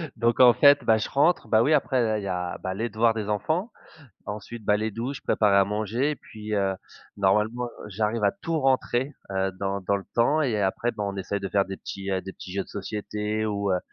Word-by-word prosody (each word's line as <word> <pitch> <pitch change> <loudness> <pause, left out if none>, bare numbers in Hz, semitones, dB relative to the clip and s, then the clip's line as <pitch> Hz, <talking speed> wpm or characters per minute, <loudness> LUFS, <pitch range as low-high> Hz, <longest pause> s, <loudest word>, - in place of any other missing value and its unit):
Donc, 115 +1 +1
en 125 -2 +8
fait, 145 0 +6
bah, 110 -1 +4
je 110 - -2
rentre, 155 +6 +2
bah, 110 0 +4
oui, 150 +6 +3
après, 135 -3 +2
là 110 -1 +1
il 100 - -5
y - - -4
a, 90 -1 -3
bah, 95 - -3
les 115 +4 -2
devoirs 115 +1 +2
des 105 -2 -4
enfants, 160 - -1 0.6
ensuite, 105 +2 -7
bah, 105 0 +3
les 110 +1 -2
douches, 125 +5 -4
préparer 105 -2 +3
à 100 - +6
manger 110 +7 -1
et - - -6
puis, 110 -2 -7
heu, 95 -1 +1 0.4
normalement, 105 +5 +1 0.2
j'arrive 105 +2 -1
à 100 - +5
tout 165 -2 -1
rentrer, 130 0 +1 0.2
heu, 95 0 0
dans 100 0 -2
dans 100 +2 0
le 95 - -7
temps 145 +7 +3
et 110 -7 0
après, 100 +5 0
bah, 105 -2 -5
on 100 0 -4
essaye 100 +1 -3
de 95 - -3
faire 100 0 +2
des 95 0 -6
petits, 95 0 -6
heu, 95 - 0
des 95 +1 -7
petits 90 - -10
jeux 100 0 -1
de - - -22
société, 105 +1 -3
ou, 100 -2 -1
heu, 90 - +2
105 Hz, 235 wpm, -26 LUFS, 100-120 Hz, 0.6 s, en